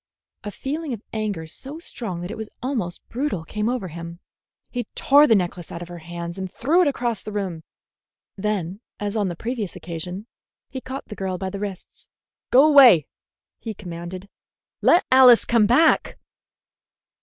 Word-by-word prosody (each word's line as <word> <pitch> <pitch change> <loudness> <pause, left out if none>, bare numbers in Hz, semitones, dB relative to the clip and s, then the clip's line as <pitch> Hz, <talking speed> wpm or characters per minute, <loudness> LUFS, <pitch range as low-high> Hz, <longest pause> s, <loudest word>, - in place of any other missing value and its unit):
A 210 - -4
feeling 285 +6 -4
of 220 - -7
anger 210 -7 -2
so 270 - -8
strong 220 - -6
that 175 +3 -5
it - - -5
was 220 -1 -6
almost 225 -10 -3
brutal 250 - -2
came 210 +6 -2
over 240 -7 -2
him. 170 +1 -8 0.5
He 245 -1 -3
tore 290 +2 +6
the 225 - +5
necklace 175 -3 -2
out 170 - -6
of 175 - -11
her 175 -1 -8
hands 170 +2 -7
and 190 -1 -5
threw 320 +9 +2
it 350 - +3
across 240 -6 -1
the 215 - -7
room. 190 -6 -3 0.7
Then, 200 -1 -3 0.2
as 205 +1 -3
on 210 -3 +1
the 175 - -4
previous 225 -1 -4
occasion, 180 +4 -6 0.5
he 260 - -5
caught 265 +2 -7
the 210 - -6
girl 190 -2 -3
by 190 0 -4
the 200 - -5
wrists. 200 -3 -7 0.4
"Go 265 +4 +7
away!" 260 - +8 0.5
he 220 -2 -6
commanded. 180 0 -8 0.5
"Let 350 - +5
Alice 255 -2 +8
come 230 -3 +3
back!" 295 +8 +3
210 Hz, 170 wpm, -23 LUFS, 175-250 Hz, 0.7 s, away